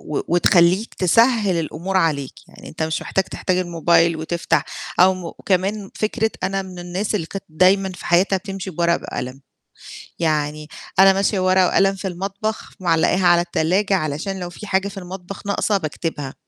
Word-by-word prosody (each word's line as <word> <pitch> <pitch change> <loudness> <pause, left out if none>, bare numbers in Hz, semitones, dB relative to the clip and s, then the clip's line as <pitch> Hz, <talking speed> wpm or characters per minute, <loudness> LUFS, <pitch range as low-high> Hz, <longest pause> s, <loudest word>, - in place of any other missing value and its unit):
و 150 - -3
وتخلّيك 175 +4 +3
تسهّل 210 0 +3
الأمور 175 +4 -3
عليك، 150 -6 +1 0.2
يعني - - -13
أنت 160 - -5
مش 160 0 -1
محتاج 190 - 0
تحتاج 185 - -2
الموبايل 170 -1 +2
وتفتح 165 +2 -1 0.4
أو 185 +1 +6
م 175 -2 -7
كمان 195 +2 0
فكرة 220 +1 -1
أنا 195 +1 -1
من 185 -1 -10
الناس 180 +5 -3
اللي 165 -6 -1
كانت 195 +1 -7
دايمًا 185 +4 +3
في 180 - -10
حياتها 185 +3 +3
بتمشي 195 0 -6
بورقة 170 0 +1
بقلم، 130 +2 -6 0.8
يعني 155 -2 -1 0.3
أنا 195 0 +8
ماشية 195 0 0
ورقة 185 0 +4
وقلم 195 +1 +3
في 195 0 -5
المطبخ 195 +4 -4
معلقّاها 175 +1 +2
على 175 0 +6
التلاجة، 180 +4 0
علشان 175 +4 -2
لو 175 -1 -5
في 210 - -10
حاجة 195 0 0
في 195 0 -9
المطبخ 185 +2 -9
ناقصة 205 +1 +1
باكتبها، 155 -3 -4
185 Hz, 165 wpm, -21 LUFS, 165-195 Hz, 0.8 s, أنا